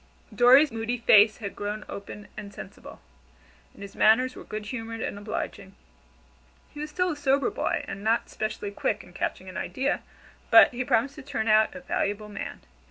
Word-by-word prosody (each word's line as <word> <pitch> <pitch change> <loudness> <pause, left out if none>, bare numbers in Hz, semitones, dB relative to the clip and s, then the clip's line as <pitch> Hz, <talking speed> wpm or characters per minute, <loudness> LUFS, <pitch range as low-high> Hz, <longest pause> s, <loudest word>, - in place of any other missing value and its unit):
Dorry's 260 +4 +6
moody 225 +2 -2
face 215 -2 +6
had 200 -4 -6
grown 210 +1 -4
open 200 +1 -8
and 200 - -8
sensible, - - -11 0.8
and - - -11
his 200 0 -10
manners 250 +4 +4
were - - -9
good 215 0 -6
humored 225 0 -5
and - - -3
obliging. 205 -2 -6 1.0
He 295 - -11
was 300 +1 -4
still 360 +3 0
a - - -3
sober 280 +6 +1
boy, 455 - -2
and 195 - -7
not 225 +2 +1
specially 215 -1 -4
quick - - -2
in 180 - -17
catching 185 - -3
an 185 - -7
idea, 270 +2 -1 0.5
but - - +8
he 250 +1 -2
promised 250 +1 +1
to - - -7
turn 245 -5 -3
out 220 +6 +4
a 275 - -8
valuable 210 -6 -2
man. 205 - -7
225 Hz, 180 wpm, -26 LUFS, 205-265 Hz, 1.0 s, but